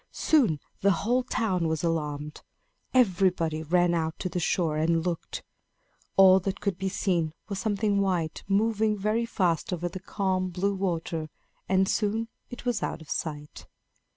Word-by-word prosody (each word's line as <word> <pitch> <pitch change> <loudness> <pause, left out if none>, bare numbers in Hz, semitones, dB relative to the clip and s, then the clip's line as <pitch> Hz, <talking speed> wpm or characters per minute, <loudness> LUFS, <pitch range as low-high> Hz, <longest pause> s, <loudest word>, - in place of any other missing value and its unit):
Soon 235 - +2 0.2
the 200 - +3 0.2
whole 245 +3 +3
town 190 -8 0
was 160 0 -1
alarmed. 150 -2 -2 0.5
Everybody 180 -9 +2
ran 175 +2 +2
out 160 -1 -1
to 185 - -3
the 180 - -2
shore 165 -2 +1
and 165 +2 +1
looked. 175 -2 -3 0.7
All 190 -1 +8
that 195 +1 -3
could 195 -3 -2
be 190 0 -1
seen 175 -5 0
was 200 -3 -4
something 205 -2 +1
white 175 -5 -1
moving 215 +1 +2
very 215 +4 0
fast 180 -8 0
over 175 -1 -2
the 175 +2 -6
calm, 190 -1 -1
blue 190 +3 0
water; 170 -4 -2 0.4
and 190 0 +3
soon 220 +3 0 0.2
it 245 - -9
was 240 -3 0
out - - -3
of 150 - -11
sight. 150 -2 -5
185 Hz, 155 wpm, -27 LUFS, 165-200 Hz, 0.7 s, All